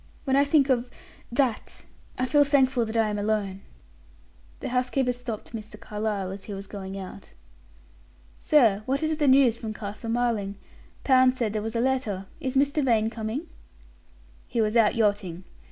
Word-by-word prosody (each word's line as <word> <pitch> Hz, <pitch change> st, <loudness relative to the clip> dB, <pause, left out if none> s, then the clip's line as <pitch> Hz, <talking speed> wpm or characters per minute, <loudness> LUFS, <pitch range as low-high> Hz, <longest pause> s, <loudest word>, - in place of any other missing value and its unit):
When 265 Hz, -1 st, +1 dB
I 280 Hz, -, +5 dB
think 285 Hz, -1 st, +3 dB
of 245 Hz, -1 st, +1 dB, 0.4 s
that 240 Hz, -2 st, -1 dB, 0.3 s
I 255 Hz, -, 0 dB
feel 290 Hz, +3 st, +4 dB
thankful 265 Hz, -4 st, +3 dB
that 220 Hz, +1 st, -3 dB
I 220 Hz, -1 st, +3 dB
am 210 Hz, 0 st, -2 dB
alone." 205 Hz, -2 st, -1 dB, 1.0 s
The -, -, -4 dB
housekeeper 250 Hz, +1 st, +1 dB
stopped 240 Hz, -3 st, -7 dB
Mr. 215 Hz, -1 st, -8 dB
Carlyle 210 Hz, -3 st, -3 dB
as 195 Hz, 0 st, -8 dB
he 205 Hz, -, -6 dB
was 195 Hz, 0 st, -7 dB
going 195 Hz, -1 st, -7 dB
out. 195 Hz, +1 st, -9 dB, 1.1 s
"Sir, 230 Hz, -10 st, +4 dB
what 275 Hz, +4 st, 0 dB
is 315 Hz, 0 st, 0 dB
the 295 Hz, -2 st, +1 dB
news 260 Hz, -3 st, +5 dB
from 220 Hz, -2 st, -5 dB
Castle 210 Hz, +2 st, -6 dB
Marling? 225 Hz, -4 st, 0 dB, 0.5 s
Pound 255 Hz, -1 st, +4 dB
said 220 Hz, -4 st, -1 dB
there 215 Hz, -, -1 dB
was 225 Hz, +2 st, -5 dB
a -, -, +1 dB
letter. 235 Hz, -7 st, -1 dB
Is 265 Hz, 0 st, -2 dB
Mr. 285 Hz, +2 st, +2 dB
Vane 225 Hz, -3 st, +2 dB
coming?" 230 Hz, +7 st, -4 dB, 1.0 s
"He 235 Hz, -, -3 dB
was 215 Hz, 0 st, +1 dB
out 225 Hz, -3 st, +4 dB
yachting. 205 Hz, -5 st, 0 dB
230 Hz, 170 wpm, -26 LUFS, 210-260 Hz, 1.1 s, I